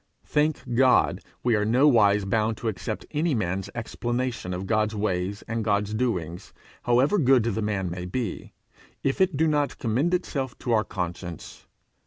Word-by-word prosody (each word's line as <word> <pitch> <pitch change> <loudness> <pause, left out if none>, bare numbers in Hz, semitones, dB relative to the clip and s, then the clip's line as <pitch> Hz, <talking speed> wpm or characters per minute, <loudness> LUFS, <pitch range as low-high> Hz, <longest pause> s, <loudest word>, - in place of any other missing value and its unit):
Thank 150 -4 0
God, 130 +1 +4 0.2
we 120 -2 +3
are 105 - +1
nowise 110 -4 +4
bound 110 +2 0
to 115 - -4
accept 110 +1 -4
any 155 0 +1
man's 95 -3 -2
explanation 120 -2 -3
of 90 +1 -4
God's 110 0 +1
ways 100 -1 -2
and 115 0 -2
God's 105 0 0
doings, 90 -8 -2 0.3
however 130 +11 +3
good 130 -5 +4
the 110 -1 -1
man 100 -3 -1
may 90 +1 -5
be, 120 +5 -4 0.5
if 135 +6 0
it 185 -6 +2
do 160 - +3
not 150 -2 0
commend 135 +10 +1
itself 135 -8 -3
to 120 - -4
our 110 -2 +3
conscience. 85 -3 -6
115 Hz, 160 wpm, -26 LUFS, 100-130 Hz, 0.5 s, God